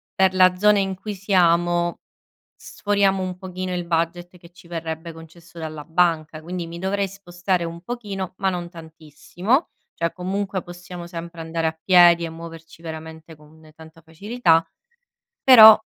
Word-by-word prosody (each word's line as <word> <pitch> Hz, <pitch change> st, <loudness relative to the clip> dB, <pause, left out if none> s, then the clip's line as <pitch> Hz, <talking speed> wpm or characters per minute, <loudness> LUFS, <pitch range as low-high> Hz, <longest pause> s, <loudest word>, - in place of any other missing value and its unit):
per 190 Hz, -1 st, +3 dB
la 185 Hz, -1 st, +5 dB
zona 210 Hz, +2 st, +4 dB
in 195 Hz, -1 st, -1 dB
cui 205 Hz, +3 st, -6 dB
siamo, 175 Hz, -3 st, +1 dB, 0.6 s
sforiamo 200 Hz, -2 st, 0 dB
un 185 Hz, -1 st, -4 dB
pochino 185 Hz, 0 st, -5 dB
il 175 Hz, -1 st, -4 dB
budget 170 Hz, +1 st, -2 dB
che 170 Hz, 0 st, -17 dB
ci 175 Hz, -1 st, -18 dB
verrebbe 165 Hz, 0 st, -5 dB
concesso 165 Hz, +1 st, -15 dB
dalla 155 Hz, -2 st, -7 dB
banca, 160 Hz, -2 st, 0 dB
quindi 175 Hz, +1 st, -5 dB
mi 170 Hz, +1 st, -8 dB
dovrei 195 Hz, +2 st, -1 dB
spostare 180 Hz, -1 st, -3 dB
un 170 Hz, 0 st, -7 dB
pochino 200 Hz, -4 st, -6 dB
ma 195 Hz, -1 st, +1 dB
non 175 Hz, -1 st, -5 dB
tantissimo, 170 Hz, -, -3 dB, 0.2 s
cioè 170 Hz, 0 st, -2 dB
comunque 190 Hz, +1 st, -3 dB
possiamo 175 Hz, 0 st, -10 dB
sempre 170 Hz, -1 st, -8 dB
andare 165 Hz, 0 st, -2 dB
a 160 Hz, 0 st, -7 dB
piedi 175 Hz, -2 st, +6 dB
e 165 Hz, -, -4 dB
muoverci 165 Hz, 0 st, -11 dB
veramente 160 Hz, 0 st, -9 dB
con 155 Hz, +1 st, -19 dB
tanta 160 Hz, +1 st, -16 dB
facilità, 165 Hz, +1 st, +1 dB, 0.8 s
però 220 Hz, -4 st, +10 dB
175 Hz, 150 wpm, -22 LUFS, 165-190 Hz, 0.8 s, però